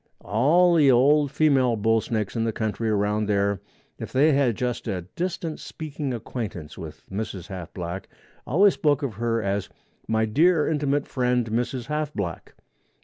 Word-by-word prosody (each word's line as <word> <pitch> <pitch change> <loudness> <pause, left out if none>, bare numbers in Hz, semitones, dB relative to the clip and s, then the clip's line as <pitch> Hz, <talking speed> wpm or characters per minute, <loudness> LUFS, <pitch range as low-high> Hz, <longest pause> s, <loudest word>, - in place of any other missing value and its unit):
All 150 - +4
the 150 -5 +5
old 140 +4 +4
female 135 -7 +3
bull 115 +1 +2
snakes 110 -2 -3
in 115 - 0
the 115 - 0
country 110 +1 -2
around 105 0 +1
there, 100 -1 +1 0.4
if - - -6
they 145 +4 +4
had 135 -5 +2
just 125 0 -3
a 95 -5 -2
distant 170 -3 -3
speaking 150 -3 -5
acquaintance 105 - -5
with 80 -2 -9
Mrs. 100 -2 -5
Half 90 -4 -7
Black, 90 +1 -5 0.4
always 195 +8 +5
spoke 145 -2 +1
of 130 -5 -2
her 115 +1 -1
as 100 0 -1 0.4
"my 110 0 +2
dear 155 +8 +3
intimate 145 -2 0
friend 125 -3 0
Mrs. 120 +2 -1
Half 150 +1 -3
Black." 85 -6 -5
120 Hz, 160 wpm, -25 LUFS, 105-145 Hz, 0.4 s, the